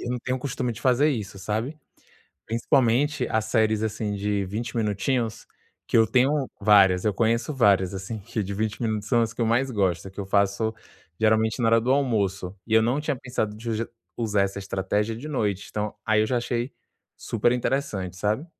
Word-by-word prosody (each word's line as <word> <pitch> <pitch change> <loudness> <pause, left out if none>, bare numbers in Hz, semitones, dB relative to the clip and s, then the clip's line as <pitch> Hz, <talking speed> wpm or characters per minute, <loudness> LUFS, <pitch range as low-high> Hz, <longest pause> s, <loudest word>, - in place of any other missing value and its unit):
Eu 120 - -4
não 125 - -1
tenho 130 +1 -2
o - - -16
costume 125 -2 -2
de 115 - -10
fazer 130 +3 +3
isso, 105 -6 -4
sabe. 115 +10 -3 0.7
Principalmente, 125 +5 +2
as 110 -1 +1
séries 110 -1 +2
assim 105 -1 -2
de 100 0 -1
20 115 +5 -4
minutinhos, 110 +2 -1 0.4
que - - +1
eu 110 - +5
tenho 135 +2 +2
várias. 100 -3 +5
Eu 105 - +2
conheço 115 - +1
várias, 100 -7 +3
assim 95 +4 -5
que 110 +1 -4
de 100 +1 -4
20 110 +2 -2
minutos 110 -2 -1
são 120 +1 +3
as 115 -1 0
que - - -7
eu - - +2
mais 125 +4 +2
gosto, 95 -7 0
só 95 - -8
que 95 - -19
eu - - -3
faço, 100 +3 +1 0.5
geralmente, 110 +2 +2
na 115 - +3
hora 115 0 +5
do 125 - -1
almoço. 100 -8 0
E 110 - -6
eu 110 - +7
não 120 +6 +1
tinha 150 -3 -1
pensado 120 -5 -3
de 115 +2 -8
uju 110 +1 -2 0.3
usar 105 -4 +1
essa 100 0 -2
estratégia 100 +3 -1
de 125 +7 -7
noite. 105 -9 -1
Então, 105 0 -3
aí 110 0 +3
eu - - +1
já 125 +1 +1
achei 120 +2 -2 0.4
super 115 +2 0
interessante, 110 -8 -2
sabe. 105 - -1
110 Hz, 205 wpm, -25 LUFS, 100-120 Hz, 0.7 s, eu